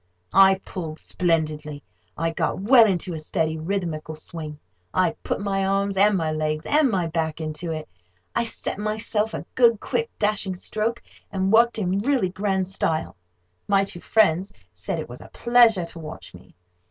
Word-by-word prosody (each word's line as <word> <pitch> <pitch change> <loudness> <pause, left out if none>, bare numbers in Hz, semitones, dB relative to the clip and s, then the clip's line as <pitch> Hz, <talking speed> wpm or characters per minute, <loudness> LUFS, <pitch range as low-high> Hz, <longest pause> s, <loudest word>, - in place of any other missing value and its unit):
I 195 +1 +7
pulled 160 -4 -6
splendidly. 155 -5 -1 0.3
I 165 +1 0
got 165 - -1
well 230 +3 +7
into 180 -2 -1
a 160 - -4
steady 160 +1 -1
rhythmical 160 -3 -3
swing. 155 -1 -7 0.4
I 180 -2 +3
put - - -2
my 195 -1 -1
arms, 195 +1 0
and 200 +1 +4
my 160 -3 -1
legs, 155 0 -2
and 300 -2 +3
my 185 -6 0
back 160 -1 -2
into 160 +2 -4
it. 155 -1 -5 0.5
I - - +2
set 225 - -4
myself 215 +1 -1
a - - -6
good, 235 -4 +4
quick, 460 - -2
dashing 205 -3 0
stroke, 215 +5 -3 0.3
and 190 +1 0
worked 235 +1 +5
in 190 -2 0
really 245 -4 +1
grand 190 0 -1
style. 160 - -1 0.5
My 195 -1 +4
two 195 -3 -6
friends 195 -3 +2 0.2
said 90 - -4
it 155 - -5
was 120 +1 -10
a - - -12
pleasure 235 -6 +4
to 170 - -11
watch 100 - -9
me. 90 - -16
185 Hz, 170 wpm, -24 LUFS, 160-210 Hz, 0.5 s, I